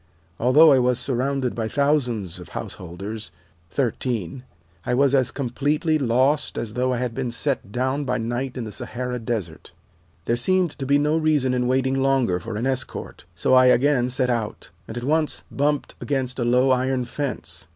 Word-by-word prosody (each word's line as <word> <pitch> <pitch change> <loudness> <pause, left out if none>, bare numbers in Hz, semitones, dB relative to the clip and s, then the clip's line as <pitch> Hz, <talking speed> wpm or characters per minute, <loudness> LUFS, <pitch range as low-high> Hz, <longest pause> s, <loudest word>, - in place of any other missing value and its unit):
Although 145 +6 +6
I 135 - +5
was 125 -1 +2
surrounded 130 +1 -1
by 115 -2 -2
thousands 120 - 0
of 90 - -11
householders 100 +5 -6 0.4
13 120 - -2 0.4
I 125 - 0
was 140 +1 +3
as 130 -3 +3
completely 145 +4 0
lost 130 +3 +1
as 110 -2 -4
though 125 +2 0
I 125 - 0
had 125 -1 -2
been 120 +1 -3
set 125 -4 -2
down 130 +5 -1
by 125 -2 -1
night 120 +3 -3
in 125 - -3
the 110 - -6
Sahara 125 +4 -4
Desert. 105 -9 -4 0.5
There 115 - +1
seemed 180 +7 +1
to 135 - -3
be 140 +1 +4
no 150 +2 +2
reason 150 -5 +2
in 125 -1 0
waiting 130 +1 +1
longer 130 -9 +2
for 115 +3 -6
an 110 +4 -2
escort, 130 -1 -4
so 85 - +1
I 130 0 +7
again 125 0 +3
set 125 0 +1
out, 115 -3 -3 0.2
and 110 - -7
at 120 - -4
once 155 +3 0
bumped 145 +1 0
against 130 -3 -2
a 120 - 0
low 125 +2 +3
iron 130 0 +1
fence. 95 - -4
125 Hz, 180 wpm, -23 LUFS, 120-135 Hz, 0.5 s, I